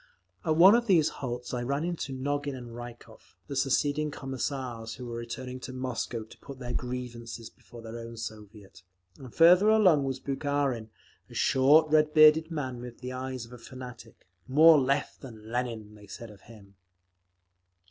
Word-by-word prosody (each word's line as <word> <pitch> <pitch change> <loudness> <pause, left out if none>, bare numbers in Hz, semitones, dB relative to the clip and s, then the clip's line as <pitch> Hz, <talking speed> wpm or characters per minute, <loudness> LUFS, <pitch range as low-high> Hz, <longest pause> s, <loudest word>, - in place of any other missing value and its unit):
At 155 - +1
one 185 +5 +8
of 235 0 +2
these 165 -6 +4
halts 125 -2 -5
I 125 - -2
ran 140 +5 -1
into 170 -5 -3
Nogin 140 +1 -2
and 120 -2 -9
Rykov, 120 -2 -12
the 140 - -6
seceding 145 +3 +1
Commissars, 130 -4 -5
who 125 - -8
were 120 -1 -6
returning 125 +2 -6
to 130 - -8
Moscow 125 -2 -4
to 110 - -16
put 140 -2 -10
their 120 -2 -6
grievances 120 -2 -6
before 120 -1 -14
their 115 +1 -7
own 115 0 -9
Soviet, 105 -3 -9 0.4
and 130 -3 -10
further 180 - +6
along 185 -10 +5
was 135 -1 -3
Bukharin, 135 -4 -2 0.4
a - - -13
short, 150 +4 +4
red 155 0 +3
bearded 155 +1 +7
man 130 -7 -4
with 120 -1 -10
the 125 0 -5
eyes 130 -1 -5
of 115 - -15
a 125 - -11
fanatic—"more 125 - +1
Left 140 +2 -1
than 110 -4 -11
Lenin," 115 -4 -3
they 105 -1 -15
said 115 +3 -9
of 100 -2 -16
him…. 100 -4 -17
130 Hz, 170 wpm, -28 LUFS, 115-145 Hz, 0.4 s, one